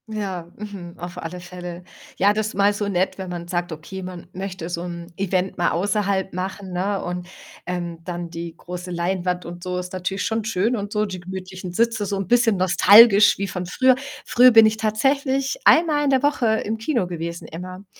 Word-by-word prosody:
Ja, 195 -6 -4
mhm, 200 -5 -8
auf 175 +1 -8
alle 175 +2 -6
Fälle. 180 0 -8 0.3
Ja, 200 +2 +4
das 215 0 -2
mal 200 +1 +3
so 205 0 -2
nett, 185 -1 0
wenn 190 -1 -5
man 175 -1 -6
sagt, 175 0 -2
okay, 160 +5 -7
man 180 -2 -8
möchte 185 -2 -5
so 170 -1 -3
'n 170 -1 -7
Event 190 0 -1
mal 175 - +3
außerhalb 195 0 0
machen, 185 +1 -5
ne, 195 +3 -1
und, 180 0 -4 0.4
ähm, 175 -2 -4
dann 175 -1 -5
die 170 0 -6
große 180 +1 -7
Leinwand, 180 +1 -2
und 175 +1 -8
so, 180 0 -3
ist 180 0 -5
natürlich 185 +2 -2
schon 225 0 -1
schön, 220 +2 0
und 205 -2 -4
so, 210 0 +1
die 190 -3 -6
gemütlichen 185 0 -7
Sitze, 225 +2 +1
so 200 0 -2
'n 195 -2 -3
bisschen 235 -3 +3
nostalgisch 205 +3 +7
wie 200 - -2
von 180 -1 -4
früher. 255 +8 +4 0.3
Früher 250 +1 +6
bin 225 -1 +8
ich 215 0 +2
tatsächlich 270 - 0
einmal 310 -2 +5
in - - +2
der 265 0 +2
Woche 285 -5 +2 0.2
im 220 +2 -2
Kino 235 -2 0
gewesen 170 -1 -5
immer. 185 +4 -8
190 Hz, 195 wpm, -22 LUFS, 175-215 Hz, 0.4 s, bin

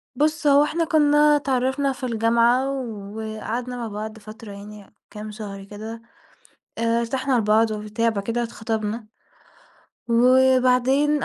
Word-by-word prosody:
بُص 305 +2 +1
هو 285 0 +6
إحنا 330 +2 -1
كنا 295 -1 +4
اتعرفنا 270 0 0
في 260 - -6
الجامعة 235 +2 +2
وقعدنا 220 0 -5
مع 235 -2 -4
بعض 215 +1 -6
فترة 215 0 -11
يعني 205 +1 -11 0.2
كام 210 0 -8
شهر 205 -2 -8
كده، 215 +3 -8 0.8
آآ 230 0 +1
ارتحنا 260 +3 -1
لبعض 220 +1 +3
وبتاع، 215 +2 -1
بعد 200 -3 -3
كده 235 +2 -1
اتخطبنا 220 -1 -4 1.0
وبعدين 255 +3 +3
230 Hz, 125 wpm, -23 LUFS, 215-260 Hz, 1.0 s, هو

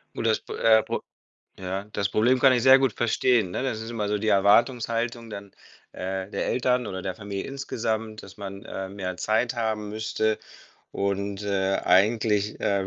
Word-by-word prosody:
Gut, 115 - -1
das 110 - +2
P - - -8
äh, 110 -1 +4
Pro - - -3 0.6
ja, 95 +1 -4
das 100 -1 0
Problem 125 +4 +3
kann 130 0 +6
ich 120 -2 +2
sehr 130 +1 +8
gut 135 -1 +1
verstehen, 120 -3 +1
ne? 110 - -3
Das 110 -4 -2
ist 115 +1 -6
immer 110 -3 -2
so 105 - +1
die 110 +1 -2
Erwartungshaltung 115 +3 +2
dann, 100 -1 -8 0.4
äh, 95 +1 -4
der - - -2
Eltern 125 0 +1
oder 95 0 -5
der 95 -1 -3
Familie 100 -2 -5
insgesamt, 110 -5 -3
dass - - -13
man, 100 -1 -8
ähm, 95 +1 -6
mehr 90 -2 -4
Zeit 115 +5 0
haben 110 -2 -2
müsste 110 0 -1 0.5
und, 100 0 -2
äh, 95 -1 0
eigentlich, 105 +1 +2
äh, 100 -1 0
110 Hz, 180 wpm, -25 LUFS, 100-115 Hz, 0.6 s, sehr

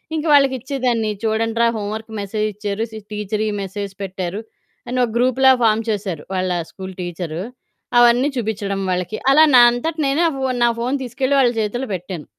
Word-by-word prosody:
ఇంక 315 0 -2
వాళ్ళకి 275 -2 +5
ఇచ్చేదాన్ని 245 -4 -1
చూడండి 225 +1 0
రా 235 - +5
హోంవర్క్ 215 +2 -5
మెసేజ్ 210 +2 -2
ఇచ్చారు, 205 +1 -3
సి 220 - -8
టీచరీ 210 +1 -2
మెసేజ్ 195 0 -5
పెట్టారు, 190 0 -4 0.5
అని 250 +1 -3
ఒక 240 - 0
గ్రూప్‌లా 255 +2 +4
ఫార్మ్ 220 0 +3
చేశారు 195 -8 -3
వాళ్ళ 185 0 -1 0.2
స్కూలు 190 -1 -8
టీచరు. 175 -2 -5 0.6
అవన్నీ 240 +3 +5
చూపిచ్చడం 210 -4 -2
వాళ్ళకి 180 +3 -2
అలా 295 +3 +7
నా 245 - +9
అంతట 275 +7 -3
నేనే 275 +3 +1
నా - - +5
ఫోను 260 -2 -1
నా - - +4
ఫోను 250 +4 0
తీసుకెళ్ళి 260 +3 -1
వాళ్ళ 255 -3 +4
చేతిలో 220 +4 -2
పెట్టాను 180 -3 -6
220 Hz, 170 wpm, -20 LUFS, 195-250 Hz, 0.6 s, నా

